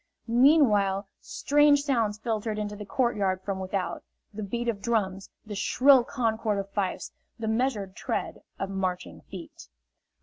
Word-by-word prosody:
Meanwhile 225 -7 +4
strange 290 0 +3
sounds 230 -7 0
filtered 215 -1 -2
into 210 -1 -3
the 205 -1 -9
courtyard 200 -6 0
from 195 -1 -3
without 185 -1 -3 0.3
the 215 - -6
beat 235 +4 -3
of 215 -4 -1
drums, 195 -4 -1 0.2
the 215 - -7
shrill 255 +6 +5
concord 225 -4 -1
of 200 0 -4
fifes, 200 -2 -2 0.3
the 225 -1 -4
measured 220 -4 -1
tread - - -3 0.2
of 195 0 -4
marching 180 - -3
feet. - - -10
210 Hz, 140 wpm, -27 LUFS, 195-235 Hz, 0.3 s, shrill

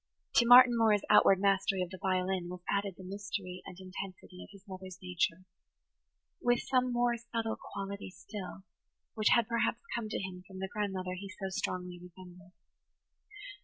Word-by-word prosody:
To 235 - +6
Martin 245 0 +9
Moore's 220 -3 +3
outward 195 - +7
mastery 195 -1 +2
of 180 - -7
the 185 - -8
violin 185 -2 0
was 180 0 -7
added 200 -2 -1
the 190 - -10
mystery 195 -1 -5
and 185 - -9
intensity 185 -1 -8
of - - -11
his 200 0 -16
mother's 185 -1 -8
nature, 180 0 -1 1.0
with 245 0 +3
some 255 -1 +1
more 240 0 +2
subtle 230 -1 -3
quality 200 0 -6
still, 185 +1 -8 0.5
which 215 -1 +2
had 235 -3 +3
perhaps 235 0 0
come 230 -2 -3
to - - -2
him 185 -1 -6
from 190 - -11
the 190 0 -3
grandmother 190 -3 -2
he 195 +2 -7
so 195 -1 -5
strongly 180 -1 -3
resembled. 180 +1 -14
195 Hz, 165 wpm, -32 LUFS, 185-215 Hz, 1.0 s, Martin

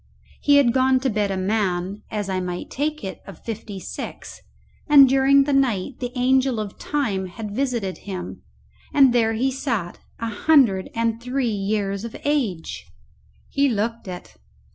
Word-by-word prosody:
He 285 - +4
had 265 -5 +5
gone 260 0 +3
to 265 -2 0
bed 210 -1 0
a 195 - -2
man, 190 -1 -1
as 210 -3 -3
I 190 -1 -1
might 180 -1 -5
take 305 +3 -2
it, 190 - -6
of 195 - -12
fifty 215 -3 -6
six, - - -8 0.5
and 280 -2 +9
during 270 +1 +5
the 285 +1 -1
night 250 -3 +1
the 245 -1 -4
angel 255 -1 +2
of 210 -2 -6
Time 210 -11 -1
had 205 +2 -7
visited 240 -8 -2
him, 185 -3 -7 0.5
and 270 -4 +6
there 225 -2 +3
he 255 +4 0
sat, 235 - -3 0.2
a 230 0 -3
hundred 225 -6 +3
and 230 0 0
three 250 -1 -1
years 200 0 -1
of 230 - -6
age! 245 - -1 0.6
He 280 0 +2
looked 225 0 -2
it. 180 -1 -9
230 Hz, 165 wpm, -23 LUFS, 195-265 Hz, 0.6 s, and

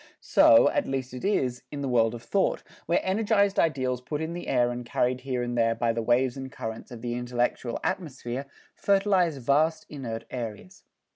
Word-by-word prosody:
So, 115 - +6
at - - -1
least 130 -1 -3
it 125 - -7
is, 130 -11 0
in 145 -1 -5
the 140 - -2
world 115 -2 +2
of 115 - -9
thought, 195 - 0 0.2
where 170 - +3
energized 200 0 +2
ideals 130 -6 +1
put 145 +4 -4
in 160 +1 -3
the 175 - -6
air 120 0 +2
and 120 0 -5
carried 125 +1 0
here 125 -2 -2
and 120 0 -3
there 115 -1 +2
by 115 0 +1
the 115 - -2
waves 120 +2 +2
and 135 -1 -7
currents 110 -3 -6
of 120 -2 -10
the 120 -1 -2
intellectual 120 0 -1
atmosphere, 140 -7 -3 0.3
fertilize 195 -5 +2
vast 150 +5 +1
inert 120 -6 -5
areas. 125 - -7
130 Hz, 190 wpm, -27 LUFS, 120-160 Hz, 0.3 s, So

